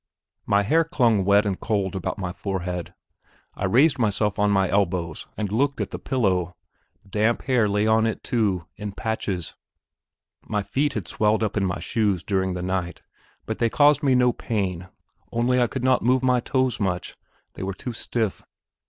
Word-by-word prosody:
My 100 0 +3
hair 160 +11 +3
clung 120 - +2
wet 100 +2 +4
and 100 -3 -1
cold 100 -3 -1
about 95 - -3
my 95 -3 -4
forehead. 90 -3 -4 0.6
I 95 - -3
raised 135 +9 +4
myself 105 -2 0
on 105 0 +3
my 95 -2 +3
elbow 90 -4 0 0.2
and 105 -2 -2
looked 140 +5 +1
at - - -3
the - - -5
pillow; 95 -9 0 0.5
damp 110 +4 +1
hair 125 -5 +2
lay 105 +1 +1
on 110 +1 +3
it, 110 - -4
too, 100 -8 0
in 105 -1 -5
patches. 100 -6 -3 0.9
My 105 -2 -1
feet 140 +6 0
had 100 -8 -4
swelled 110 +5 +1
up 105 - -1
in 100 -2 +1
my 90 - -3
shoes 100 -6 0
during 95 -2 0
the 90 - -4
night, 90 -1 -3 0.4
but - - -4
they 115 - +2
caused 145 +3 +4
me 135 -3 +3
no 125 -1 +4
pain, 95 -5 -3 0.4
only 125 +2 +2
I 120 - +3
could 130 0 -5
not 130 -1 +3
move 130 +2 +2
my 125 -1 +3
toes 130 +1 0
much, 90 -4 -2 0.4
they - - -9
were 95 0 -3
too 125 +4 -6
stiff. 110 -2 -2
105 Hz, 180 wpm, -24 LUFS, 95-120 Hz, 0.9 s, wet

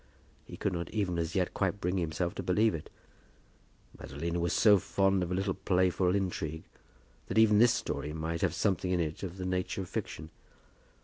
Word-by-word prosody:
He - - -10
could 100 - -1
not 85 -1 -3
even 95 -6 -1
as 85 0 -2
yet 90 -2 0
quite 95 +1 -1
bring 90 +1 -1
himself 85 +1 -2
to - - -5
believe 105 +4 +2
it. 80 -2 -6 1.1
Madalina 85 +5 -4
was 85 -1 0
so 105 +2 +5
fond 95 +1 +1
of 90 - -2
a 90 - -1
little 95 0 0
playful 95 -1 +1
intrigue, 80 -5 -2 0.6
that - - -3
even 110 -2 +6
this 115 0 +6
story 75 -10 -3
might 80 +1 -3
have 85 -3 +1
something 95 -2 0
in 90 -1 +1
it 80 -2 -2
of 95 -1 -6
the 95 - -4
nature 90 +1 -2
of 90 - -7
fiction. 80 +1 -5
90 Hz, 190 wpm, -31 LUFS, 85-95 Hz, 1.1 s, even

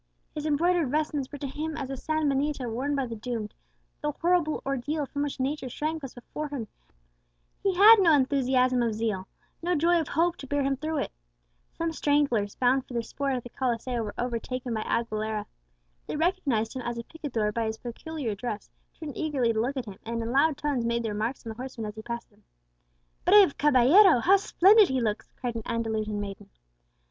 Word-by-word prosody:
His 300 0 -3
embroidered 330 0 +2
vestments 295 -2 -1
were 290 - -6
to 280 - -5
him 310 +3 -4
as 275 -3 -4
the 270 - -3
san 310 +3 -1
benito 275 -1 0
worn 260 +6 -1
by 275 -2 0
the 230 -2 -6
doomed; 220 -2 -4 0.5
the 295 - 0
horrible 335 -1 +1
ordeal 275 +3 -1
from 285 +1 -4
which 290 -2 -3
nature 265 0 -2
shrank 310 +5 -3
was 270 -3 -8
before 300 +5 -6
him, 285 -4 -4
and - - -29 0.9
he 390 -2 +1
had 425 +5 +9
no 355 -4 +5
enthusiasm 260 -3 +3
of 230 -2 0
zeal, 210 -4 -2 0.3
no 350 +1 +1
joy 340 +3 +3
of 310 - -5
hope, 335 +3 +1
to 275 - -9
bear 285 +1 0
him 275 0 +1
through 310 +3 -3
it. - - -2 0.7
Some 330 0 -1
stragglers, 285 -10 +1
bound 255 +1 +2
for 250 - -8
the 235 - 0
sport 275 +3 -2
at 250 - -4
the 245 - -9
Coliseo, 245 -1 -2
were 210 -2 -5
overtaken 245 +1 -3
by 220 - -1
Aguilera. 215 -2 -2 0.6
They - - -3
recognized 295 - 0
him 260 - -3
as 240 -1 -4
a 235 - -4
picador 240 -9 -3
by 230 +1 -1
his 220 0 -3
peculiar 245 +1 -5
dress, 210 0 -5 0.3
turned 305 -4 -6
eagerly 275 -8 0
to 220 - +1
look 265 +4 -2
at 255 - -3
him, 200 -3 -10
and 230 0 -3
in 230 - -3
loud 280 +2 +3
tones 285 -5 -1
made 235 0 0
their 220 -2 -2
remarks 225 +5 -3
on 225 - -4
the 220 - -10
horseman 255 -3 -6
as 210 - -5
he 220 - -7
passed 235 0 -6
them. 205 +1 -27 0.8
"Brave 385 -4 +6
caballero! 295 - +6
how 390 +8 +6
splendid 400 +2 +5
he 265 -1 +1
looks!" 215 -3 -2
cried 245 -2 -2
an 230 - -4
Andalusian 220 -3 -2
maiden. 200 -1 -7
260 Hz, 205 wpm, -27 LUFS, 230-300 Hz, 0.9 s, had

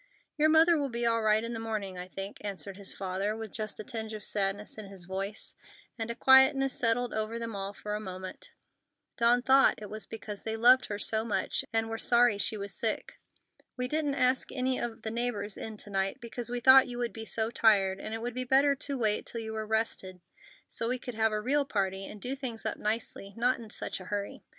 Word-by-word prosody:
"Your 310 0 +4
mother 320 +1 +6
will 280 -1 -1
be 235 -1 -1
all 230 -1 +2
right 215 0 +3
in 230 +1 -4
the 225 - -4
morning, 215 -4 -3
I 180 0 -6
think," 195 +2 -6
answered 200 -1 -5
his 200 0 -1
father, 195 +3 -2
with 220 -2 -6
just 215 -2 -4
a - - -4
tinge 220 -2 -5
of 210 - -8
sadness 205 +2 -2
in 210 - -7
his 195 -3 -10
voice; 195 +3 -2 0.4
and 225 -1 -4
a 235 - -3
quietness 265 +1 +6
settled 240 +1 0
over 220 +1 -2
them 230 -2 -5
all 195 0 -3
for 210 +1 -6
a 210 - -1
moment. 185 -2 -7 0.7
Dawn 240 +1 +4
thought 270 +1 +5
it 210 -1 -9
was 215 0 -5
because 210 -2 -7
they 220 0 -3
loved 250 +3 +6
her 205 - -3
so 220 +2 -1
much 230 - -1
and 225 0 +1
were 225 0 -4
sorry 235 -3 +4
she 215 +2 +1
was 200 -1 -5
sick. 220 +1 -3 0.6
"We 250 0 -1
didn't 295 0 0
ask 255 -1 +2
any 255 0 0
of 235 -2 -5
the 220 - -3
neighbors 225 -4 -2
in 220 -1 -7
to 205 - -8
night, 195 0 -1
because 235 0 -5
we 245 0 -3
thought 265 +2 +8
you 245 -1 -6
would 240 -1 -2
be 225 0 -6
so 220 0 -1
tired, 195 -5 +3
and 215 - -6
it 225 +1 -4
would 245 0 -3
be 255 +1 -2
better 270 +3 +4
to 280 0 -2
wait 215 -3 0
till 230 - -3
you 220 0 -5
were 220 -1 -4
rested, 215 -4 -1 0.5
so 230 - -2
we 255 - 0
could 245 0 -7
have 220 0 +2
a 215 - 0
real 280 +6 +1
party 195 -6 -2
and 210 - -9
do 250 +6 -3
things 250 -5 -5
up 220 - -2
nicely, 210 -2 -3
not 245 +2 +2
in 225 -2 -10
such - - -4
a 185 - -10
hurry. 205 +1 -4
225 Hz, 230 wpm, -30 LUFS, 205-245 Hz, 0.7 s, thought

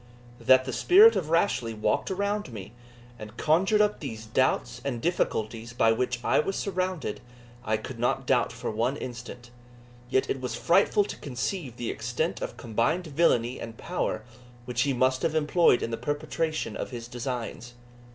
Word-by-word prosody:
That 130 0 +5
the 130 - -4
spirit 420 +6 +7
of 155 - -2
Rashleigh 130 - +1
walked 105 - 0
around 200 -3 -2
me, 105 -1 -9 0.5
and 110 +2 -10
conjured 190 +7 +3
up 210 0 +1
these 110 -6 -6
doubts 120 +1 0
and 130 -4 -2
difficulties 115 -7 -1
by 115 -2 +3
which 125 +1 -1
I - - +3
was 195 +5 -1
surrounded, 185 - -2 0.4
I 110 0 0
could 115 +2 -8
not 120 - 0
doubt - - +2
for - - -4
one 120 +6 0
instant; 120 -1 -8 0.6
yet 130 - +2
it 135 - -2
was 125 -3 -3
frightful 195 - +3
to - - -7
conceive 130 - -4
the 120 - -3
extent 125 +8 -2
of - - -5
combined 120 +9 0
villany 135 -6 +1
and 115 -1 -8
power 180 +1 -2 0.4
which 125 0 -1
he 140 - +2
must 130 +1 +2
have 160 -1 0
employed 155 -3 +3
in 115 - -3
the 115 - -2
perpetration 145 +5 -2
of - - -4
his 120 -2 -7
designs. 120 -1 -5
130 Hz, 170 wpm, -27 LUFS, 120-165 Hz, 0.6 s, spirit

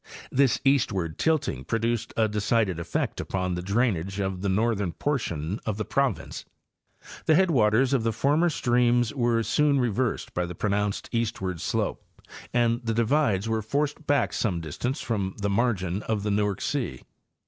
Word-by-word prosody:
This 135 -1 +3
eastward 100 - +1
tilting 155 - 0
produced 115 - -1
a 110 -1 +4
decided 105 -3 0
effect 85 - -2
upon 90 -1 -2
the 90 - -3
drainage 100 -2 0
of 95 -2 -2
the 100 - 0
northern 100 -3 +1
portion 95 - -2
of 105 -2 -2
the 110 - -2
province. 135 -6 -1 0.8
'The 155 - +6
headwaters 130 - +3
of 135 - +3
the 115 0 +1
former 145 +9 +2
streams 120 -3 +2
were 120 -4 +1
soon 145 +5 +2
re 125 -2 +2
versed 125 +3 -2
by 90 0 -1
the 90 - -7
pronounced 105 +1 -1
eastward 105 -7 -2
slope - - -1 0.5
and 120 0 +2
the 115 -1 -1
divides 115 -4 +2
were 110 -1 0
forced 145 +7 -2
back 145 0 +2
some 95 -7 0
distance 120 - -3
from 100 -5 -2
the 100 0 0
margin 100 -4 0
of 110 -2 -2
the 105 - 0
Newark 100 -1 0
'sea. 120 - -2
110 Hz, 160 wpm, -26 LUFS, 95-125 Hz, 0.8 s, The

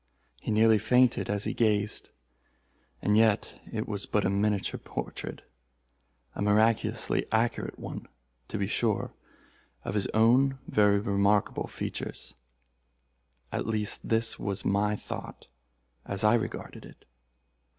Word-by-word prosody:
He - - -7
nearly 110 0 +5
fainted 125 +3 +3
as 100 0 0
he - - -1
gazed. 105 -2 0 0.9
And 105 - +3
yet 110 -1 +2
it 110 -1 -3
was 100 -2 -3
but 105 - +1
a 95 - +2
miniature 100 0 0
portrait—a - - -10
miraculously 110 +2 +2
accurate 115 +1 0
one, - - -7 0.4
to - - -4
be 100 - 0
sure—of 105 - -4
his 105 -2 0
own 125 +5 +4
very 105 -1 +4
remarkable 100 0 +1
features. 60 0 -5 1.2
At - - -2
least 105 -2 -2
this 115 0 +2
was 100 -1 -3
my 105 +2 +2
thought - - -8 0.6
as 100 0 -1
I 105 +2 +5
regarded 120 - -3
it. - - -15
105 Hz, 120 wpm, -28 LUFS, 100-110 Hz, 1.2 s, nearly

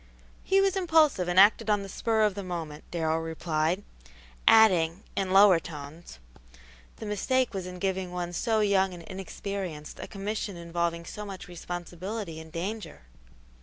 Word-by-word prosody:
"He 390 0 +3
was 390 -1 +2
impulsive 320 - +3
and 175 +1 +3
acted 215 +2 +6
on 205 -1 +2
the - - -7
spur 220 +2 0
of 210 -2 +3
the 200 - -5
moment," 165 -5 -6
Darrell 160 -1 0
replied; 165 +2 -1 0.6
adding, 185 -5 +5
in 195 -1 -1
lower 195 -2 +7
tones, 155 - -10 0.8
"the - - -8
mistake 245 +5 0
was 190 -2 -4
in 180 0 -7
giving 190 -1 -2
one 175 -1 -4
so 220 +4 +1
young 195 -3 +2
and 170 - -11
inexperienced 190 -4 -6
a - - -6
commission 205 -1 -4
involving 170 0 -2
so 210 - -7
much 195 -2 -8
responsibility 175 +1 -6
and 160 0 -11
danger." 195 - -5
185 Hz, 155 wpm, -28 LUFS, 170-210 Hz, 0.8 s, lower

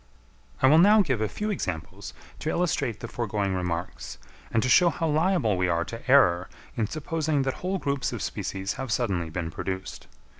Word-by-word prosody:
I - - +8
will 155 +4 +7
now 205 +4 +6
give 130 - -1
a 110 - 0
few 210 - -3
examples 85 - -5 0.2
to 155 - -3
illustrate 145 - -1
the - - -5
foregoing 105 -4 -2
remarks, 90 -1 -4 0.3
and 115 - +2
to - - +1
show 175 +7 +6
how 165 0 -2
liable 155 - +2
we 90 0 +1
are 85 0 0
to 115 +2 -8
error 90 -10 +5 0.3
in 115 -4 0
supposing 155 0 -1
that 135 -1 -1
whole 190 +2 -1
groups 140 -5 -1
of - - -4
species 95 +1 -3
have 130 -3 -4
suddenly 95 -8 0
been 80 0 -4
produced. 95 +2 -5
120 Hz, 185 wpm, -26 LUFS, 95-155 Hz, 0.3 s, I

